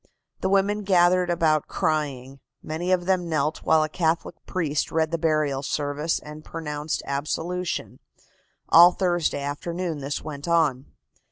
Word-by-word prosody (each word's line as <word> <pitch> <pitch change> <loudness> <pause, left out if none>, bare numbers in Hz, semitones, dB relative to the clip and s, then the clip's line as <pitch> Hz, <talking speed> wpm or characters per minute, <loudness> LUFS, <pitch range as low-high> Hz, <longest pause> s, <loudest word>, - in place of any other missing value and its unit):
The 190 - -1
women 200 +2 +2
gathered 180 -2 +3
about 160 -3 +2
crying. 135 -4 -2 0.2
Many 170 +4 -3
of 180 -1 +2
them 180 -2 +1
knelt 155 -1 0
while 160 -1 +3
a - - -1
Catholic 165 +1 -1
priest 155 -5 -1
read 160 0 +1
the 165 - -1
burial 155 -4 +1
service 145 +2 -1
and 150 0 -10
pronounced 150 -2 -4
absolution. 160 +6 -3 0.7
All 175 +2 +8
Thursday 175 -6 0
afternoon 165 +3 -3
this 140 +1 -4
went 145 -1 -7
on. 150 -6 +2
160 Hz, 140 wpm, -25 LUFS, 150-175 Hz, 0.7 s, All